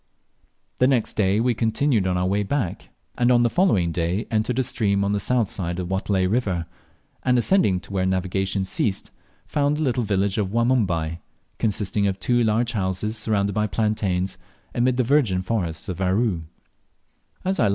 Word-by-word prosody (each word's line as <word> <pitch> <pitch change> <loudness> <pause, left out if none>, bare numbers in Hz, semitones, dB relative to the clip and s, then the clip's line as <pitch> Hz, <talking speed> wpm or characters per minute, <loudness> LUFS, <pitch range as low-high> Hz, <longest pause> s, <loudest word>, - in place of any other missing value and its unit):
The 125 - +4
next 130 -4 +1
day 100 0 +2
we 120 +1 +2
continued 115 -1 +1
our 90 0 0
way 100 +2 +1
back, 100 -3 -3 0.3
and 120 0 +4
on 120 -1 +5
the 120 - +2
following 110 - +2
day 85 +5 -1
entered 110 +3 0
a 130 - +2
stream 100 -5 0
on 100 - 0
the 105 - +1
south 120 +1 +1
side 85 -2 -3
of 90 -1 -4
the - - -2
Watelai 95 -1 0
river, 95 -6 0 0.6
and 125 -1 +2
ascending 120 - +3
to 100 - -11
where 95 -1 +1
navigation 95 +1 -1
ceased 95 +1 -2 0.3
found 145 0 0
the 155 - -1
little 125 -3 0
village 100 0 0
of 100 -3 0
Wanumbai, 100 -9 +1 0.4
consisting 105 -1 0
of 95 -1 -2
two 120 -1 +2
large 115 +2 +1
houses 100 +1 -2
surrounded 100 -3 0
by 105 0 0
plantations, 95 -3 -1 0.3
amid 125 +1 +1
the 130 - +3
virgin 115 -8 +2
forests 90 -6 -2
of 95 0 -4
Aru. 95 -2 +1
105 Hz, 170 wpm, -23 LUFS, 95-120 Hz, 0.6 s, on